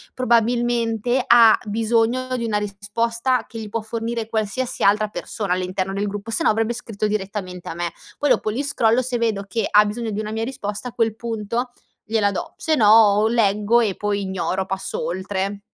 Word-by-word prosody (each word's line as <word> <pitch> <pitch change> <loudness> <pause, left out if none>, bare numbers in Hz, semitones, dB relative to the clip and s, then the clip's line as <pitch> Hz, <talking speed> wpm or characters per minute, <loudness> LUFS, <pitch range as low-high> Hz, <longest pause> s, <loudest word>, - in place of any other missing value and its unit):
probabilmente 240 0 +1
ha 230 -2 +7
bisogno 230 +4 +1
di 235 - -3
una 210 -2 0
risposta 230 +5 -1
che 225 - -8
gli 215 - -7
può 230 +2 -2
fornire 225 0 -4
qualsiasi 225 +3 -2
altra 210 +2 +4
persona 205 -2 -3
all'interno 185 +1 -2
del 205 +1 -1
gruppo 205 +3 -5
se 215 - 0
no - - +4
avrebbe 225 +2 +1
scritto 220 -3 -4
direttamente 195 -3 -4
a - - -5
me. 170 -1 -3 0.2
Poi 290 - 0
dopo 215 - +2
li 245 +7 -2
scrollo 250 -3 +2
se 245 -1 -2
vedo 220 -4 0
che 220 +4 -1
ha 210 0 +6
bisogno 225 +2 -3
di 205 - -3
una 215 0 -4
mia 225 +1 -2
risposta 230 -3 -4
a - - -15
quel 225 -2 0
punto 230 +1 -3 0.3
gliela 215 -2 +1
do. - - -5
Se 320 - 0
no 215 -6 +4
o 215 -1 +6
leggo 220 0 +3
e 205 -4 +1
poi 205 -1 -2
ignoro, 190 0 -2
passo 190 0 -4
oltre. 190 +2 -3
220 Hz, 190 wpm, -22 LUFS, 205-235 Hz, 0.3 s, ha